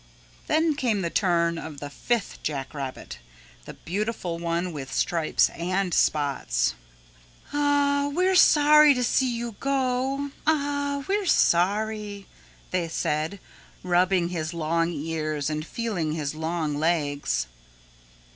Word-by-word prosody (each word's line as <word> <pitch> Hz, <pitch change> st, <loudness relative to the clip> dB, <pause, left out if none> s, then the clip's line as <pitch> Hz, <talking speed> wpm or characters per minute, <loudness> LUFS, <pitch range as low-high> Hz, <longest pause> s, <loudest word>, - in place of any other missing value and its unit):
Then 315 Hz, 0 st, +2 dB
came 235 Hz, -9 st, 0 dB
the 170 Hz, -, -2 dB
turn 170 Hz, -3 st, +1 dB
of 155 Hz, -3 st, -8 dB
the 145 Hz, 0 st, -7 dB
fifth 235 Hz, +8 st, -2 dB
jack 140 Hz, -3 st, -4 dB
rabbit, 135 Hz, -3 st, -6 dB, 0.5 s
the -, -, -9 dB
beautiful 190 Hz, -2 st, -3 dB
one 170 Hz, +1 st, -2 dB
with 135 Hz, -3 st, -7 dB
stripes 165 Hz, -3 st, +2 dB
and 185 Hz, +1 st, -2 dB
spots. 140 Hz, -, +1 dB, 0.8 s
"Ah, 285 Hz, -1 st, +2 dB
we're 365 Hz, +5 st, +2 dB
sorry 300 Hz, -4 st, +6 dB
to 250 Hz, -, 0 dB
see 255 Hz, +1 st, +2 dB
you 235 Hz, -2 st, -5 dB
go, 270 Hz, +1 st, -1 dB, 0.2 s
Ah 285 Hz, -2 st, 0 dB
h, -, -, -13 dB
we're 400 Hz, 0 st, 0 dB
sorry," 205 Hz, -, +1 dB, 0.5 s
they 180 Hz, -2 st, 0 dB
said, 160 Hz, +3 st, -2 dB, 0.4 s
rubbing 180 Hz, 0 st, +2 dB
his 165 Hz, -1 st, -4 dB
long 165 Hz, +1 st, 0 dB
ears 155 Hz, -2 st, -3 dB
and 155 Hz, 0 st, -2 dB
feeling 210 Hz, -9 st, -2 dB
of -, -, -4 dB
his 145 Hz, -2 st, -2 dB
long 160 Hz, -1 st, -2 dB
legs. 150 Hz, -, 0 dB
180 Hz, 125 wpm, -25 LUFS, 160-260 Hz, 0.8 s, sorry